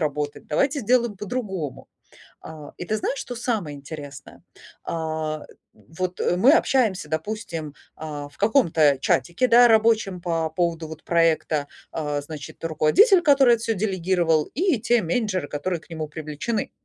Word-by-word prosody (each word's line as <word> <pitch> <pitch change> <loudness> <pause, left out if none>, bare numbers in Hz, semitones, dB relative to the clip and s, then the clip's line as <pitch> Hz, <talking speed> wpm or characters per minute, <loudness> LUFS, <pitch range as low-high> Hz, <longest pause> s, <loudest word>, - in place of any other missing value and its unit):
работать, 150 -1 -3
давайте 275 - +1
сделаем 240 -2 +1
по-другому. 190 - -5 0.6
А, 155 -2 -10
и - - -6
ты 215 - -1
знаешь, 270 - -2
что 245 - -6
самое 220 - -2
интересное? 140 -1 -10 0.4
А, 155 -2 -3 0.3
вот 180 +2 -6 0.2
мы 255 +10 +6
общаемся, 225 - +1
допустим, 160 -2 -4 0.2
а, 150 -2 -7
в 145 - -23
каком-то 165 - +3
чатике, 175 - +1
да, 245 0 +7
рабочем 220 -5 +2
по 165 -2 -1
поводу 165 0 -1
вот 160 0 -10
проекта, 160 -3 +1 0.3
э, 150 -2 -2
значит, 145 +1 -10
руководитель, 165 - +4
который 275 -6 +5
это 225 - -8
всё 225 - 0
делегировал, 180 -5 +1
и 335 - +1
те 240 +1 +2
менеджеры, 185 -2 -1
которые 165 +5 -3
к - - -22
нему 160 -2 -5
привлечены. 155 +9 -4
170 Hz, 140 wpm, -23 LUFS, 155-225 Hz, 0.6 s, да